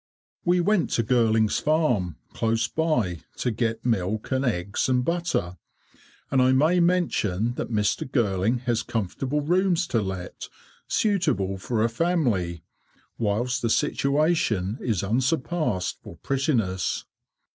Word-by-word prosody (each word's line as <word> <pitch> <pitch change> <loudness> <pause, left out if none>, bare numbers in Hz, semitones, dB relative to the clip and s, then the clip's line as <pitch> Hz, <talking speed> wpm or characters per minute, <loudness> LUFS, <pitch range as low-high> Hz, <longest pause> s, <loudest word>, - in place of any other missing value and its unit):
We 175 0 +3
went 200 0 +2
to 115 - +2
Girling's 110 -2 +2
farm, 125 - +1 0.2
close 115 0 0
by, 120 - 0 0.2
to 125 - 0
get 115 0 -2
milk, 110 -2 -1
and 130 0 +1
eggs, 100 -2 -1
and 125 -1 +2
butter, 170 - -1 0.7
and 130 - +3
I 130 +1 +4
may 155 +7 +4
mention 120 - +1
that - - -4
Mr. 105 +2 0
Girling 110 0 +1
has 120 -2 0
comfortable 125 +7 -2
rooms 180 +2 +2
to 115 - +1
let, 95 -2 -6 0.4
suitable 100 - +1
for 110 +3 -1
a - - +4
family, 115 - 0 0.6
whilst 120 +3 0
the 115 - 0
situation 140 - +1
is 110 -7 -1
unsurpassed 130 - 0
for - - -11
prettiness. 120 - -1
120 Hz, 125 wpm, -25 LUFS, 105-150 Hz, 0.7 s, I